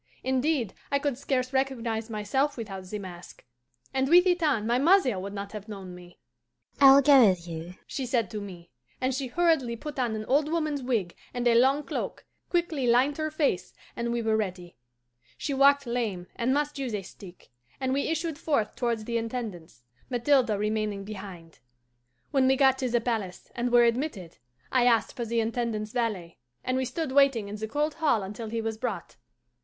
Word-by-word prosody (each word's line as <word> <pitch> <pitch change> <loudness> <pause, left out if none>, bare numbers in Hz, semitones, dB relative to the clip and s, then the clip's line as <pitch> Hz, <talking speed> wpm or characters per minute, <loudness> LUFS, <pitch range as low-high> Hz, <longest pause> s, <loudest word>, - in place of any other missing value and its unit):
Indeed, 260 -3 0 0.2
I 280 - +3
could 280 -2 -1
scarce 255 0 -2
recognize 240 -4 -1
myself 245 +7 -1
without 195 -5 -6
the 210 +3 -5
mask, 180 -3 -10 0.5
and 265 0 +1
with 355 +2 +7
it 355 -1 +2
on 275 -9 +1
my 240 +2 +2
mother 280 - +4
would 195 +2 -5
not 200 0 -6
have 210 -1 -8
known 195 -3 -8
me. 175 0 -13 0.6
'I 270 -1 +9
will 280 - +7
go 270 -5 +7
with 175 -2 -2
you,' 165 +2 -7
she 265 -2 -4
said 235 -4 +1
to 210 - -4
me, 175 -4 -10 0.3
and 260 +1 0
she 265 +1 -2
hurriedly 275 -4 +1
put 295 +4 -7
on 240 -3 0
an 215 0 -5
old 290 +5 +2
woman's 305 -4 -1
wig 225 -9 -1 0.2
and 245 0 0
a 235 - +5
long 265 +5 +4
cloak, - - -5 0.2
quickly 335 -7 0
lined 255 +5 +3
her 310 0 -1
face, 285 - -1 0.2
and 235 0 -2
we 235 -1 -1
were 220 0 +2
ready. 185 -5 -3 0.6
She 285 - -3
walked 280 +1 +5
lame, 225 -7 -2
and 240 +2 0
must 290 +1 0
use 250 -5 -2
a 200 - -4
stick, 185 -1 -13 0.3
and 260 -1 0
we 280 - 0
issued 325 -1 -2
forth 280 -10 0
towards 235 -3 -1
the 235 0 -1
Intendance, 215 - -6 0.3
Mathilde 255 0 +3
remaining 210 -1 -1
behind. 190 -5 -9 0.7
"When 265 -2 +3
we 265 - +4
got 265 -1 +4
to 255 - -1
the 240 0 +2
palace, 220 -7 -3
and 240 0 -2
were 240 0 +6
admitted, 235 - -1 0.3
I 250 -2 +3
asked 230 -2 +2
for 240 -3 -3
the 230 +1 0
Intendant's 225 -2 -2
valet, 215 -9 -3 0.2
and 255 - -1
we 260 0 0
stood 275 +3 -3
waiting 270 -6 +4
in 210 - -5
the 220 +1 -4
cold 295 +5 -1
hall 290 -10 +1
until 210 +3 -6
he 225 +1 -2
was 220 -1 -4
brought. 250 - -4
240 Hz, 190 wpm, -27 LUFS, 210-275 Hz, 0.7 s, I